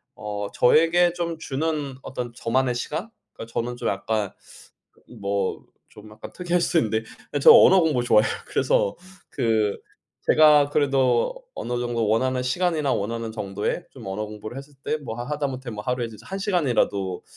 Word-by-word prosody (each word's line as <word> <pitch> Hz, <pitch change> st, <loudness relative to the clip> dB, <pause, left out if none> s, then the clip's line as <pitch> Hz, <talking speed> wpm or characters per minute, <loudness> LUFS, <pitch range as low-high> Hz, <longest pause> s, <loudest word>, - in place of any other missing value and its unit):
어 105 Hz, -1 st, -5 dB
저에게 165 Hz, +6 st, +4 dB
좀 170 Hz, -2 st, -3 dB
주는 145 Hz, -1 st, -2 dB
어떤 120 Hz, -2 st, -5 dB
저만의 125 Hz, +1 st, 0 dB
시간? 165 Hz, -, -4 dB, 0.2 s
그러니까 115 Hz, +1 st, -10 dB
저는 120 Hz, +1 st, -2 dB
좀 -, -, -1 dB
약간 110 Hz, -3 st, -2 dB, 0.6 s
그 -, -, -28 dB, 0.2 s
뭐 100 Hz, -1 st, -2 dB, 0.3 s
좀 105 Hz, 0 st, -14 dB
약간 110 Hz, -, -10 dB
특이할 175 Hz, -1 st, 0 dB
수 170 Hz, -, +1 dB
있는데 110 Hz, -2 st, 0 dB, 0.4 s
저 -, -, +9 dB
언어 190 Hz, 0 st, +8 dB
공부 150 Hz, -7 st, +1 dB
좋아해요. 110 Hz, -2 st, +4 dB, 0.2 s
그래서 -, -, +1 dB, 0.4 s
그 110 Hz, -3 st, +1 dB, 0.5 s
제가 150 Hz, -2 st, +6 dB
그래도 135 Hz, -, +2 dB, 0.2 s
어느 120 Hz, 0 st, -3 dB
정도 120 Hz, -3 st, -1 dB
원하는 125 Hz, +4 st, +1 dB
시간이나 150 Hz, +1 st, 0 dB
원하는 115 Hz, +2 st, -3 dB
정도의 105 Hz, -2 st, -3 dB
좀 -, -, -12 dB
언어 105 Hz, +3 st, -3 dB
공부를 105 Hz, +4 st, -8 dB
했을 140 Hz, +1 st, -10 dB
때 155 Hz, -, -1 dB
뭐 125 Hz, -7 st, -7 dB
하 120 Hz, -, -4 dB
하다못해 135 Hz, -4 st, -3 dB
뭐 105 Hz, 0 st, -6 dB
하루에 125 Hz, -1 st, -1 dB
이제 110 Hz, -2 st, -12 dB
1 195 Hz, -, -4 dB
시간이라도 120 Hz, -, 0 dB
125 Hz, 330 characters per minute, -24 LUFS, 110-150 Hz, 0.6 s, 저